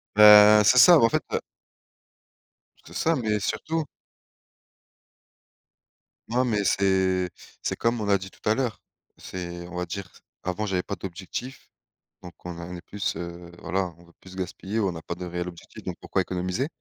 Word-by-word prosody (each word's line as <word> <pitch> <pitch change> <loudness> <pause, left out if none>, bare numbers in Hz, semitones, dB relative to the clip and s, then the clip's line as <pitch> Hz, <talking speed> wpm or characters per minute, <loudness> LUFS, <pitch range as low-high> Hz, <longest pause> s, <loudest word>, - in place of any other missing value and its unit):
Bah, 105 0 +9
c'est 115 +5 +5
ça, 170 +8 +9
bah, 115 - +5
en - - +3
fait, - - 0
heu - - +2 1.5
C'est - - -13
ça, 165 +1 +2
mais 110 -5 0
surtout 155 +11 -2 2.5
Non, 125 +2 +2
mais 105 -4 0
c'est 95 -1 +2 0.3
c'est - - -2
comme 115 0 0
on 105 - -3
a 100 -1 +4
dit 95 0 -9
tout - - -11
à 110 - +4
l'heure, 125 -4 -2 0.4
c'est 85 -1 -7
on 90 - -10
va 90 0 -2
dire 95 +2 -6 0.3
avant 95 +3 -2
j'avais 95 -3 0
pas 100 - -4
d'objectif 95 +8 -7 0.5
donc 90 -2 -10
on 90 -1 -6
en 90 +1 -7
est 85 - -8
plus, 100 0 -3
heu 85 0 -7
voilà 90 +1 -2
on 85 - -18
veut 85 - -20
plus 95 0 -13
gaspiller, 95 +3 -3
on 95 -3 +1
n'a 80 - -7
pas 85 - -5
de 90 +1 -7
réel 90 0 -4
objectifs 85 -2 -11
donc - - -4
pourquoi - - 0
économiser? 90 +9 -2
95 Hz, 180 wpm, -26 LUFS, 90-105 Hz, 2.5 s, Bah